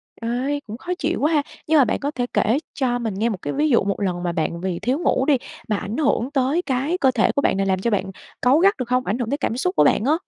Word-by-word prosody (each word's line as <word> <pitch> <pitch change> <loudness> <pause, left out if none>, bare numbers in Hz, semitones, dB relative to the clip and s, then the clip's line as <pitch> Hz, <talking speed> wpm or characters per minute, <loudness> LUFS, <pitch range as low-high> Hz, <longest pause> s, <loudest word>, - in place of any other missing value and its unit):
Ê! 250 +5 -2
Cũng 220 +2 -6
khó 350 - -6
chịu 335 +3 -1
quá 310 +3 +2
ha! 295 - +4 0.3
Nhưng 315 0 +4
mà 270 - +6
bạn - - -1
có 285 +1 -2
thể 245 -4 -2
kể 225 +5 +2 0.2
cho 245 -3 0
mình 225 -3 -3
nghe 215 +5 0
một 210 - -3
cái - - -3
ví 300 +2 +1
dụ 235 -7 +4
một 200 +1 -2
lần 180 -2 -1
mà 175 - 0
bạn 170 +1 -2
vì 185 -2 -2
thiếu 260 +6 0
ngủ 265 -6 +1
đi 285 -2 +4 0.3
mà 215 - +2
ảnh 205 +4 -5
hưởng 275 -3 +1
tới 275 +6 +1
cái 280 +4 -1
cơ 265 -7 +3
thể 230 - +2
của 280 - 0
bạn 195 - +1
này, 195 - +1
làm 190 -1 +1
cho 235 +5 -1
bạn 195 -2 -1 0.3
cáu 255 +4 +4
gắt 395 +3 +4
được 250 -2 -4
hông, 255 0 +1
ảnh 210 +6 -1
hưởng 235 -2 -2
tới 285 - 0
cảm 240 -4 -2
xúc 365 +8 -1
của - - +5
bạn 210 - +3
á? 295 - +3
250 Hz, 305 wpm, -22 LUFS, 210-285 Hz, 0.3 s, mà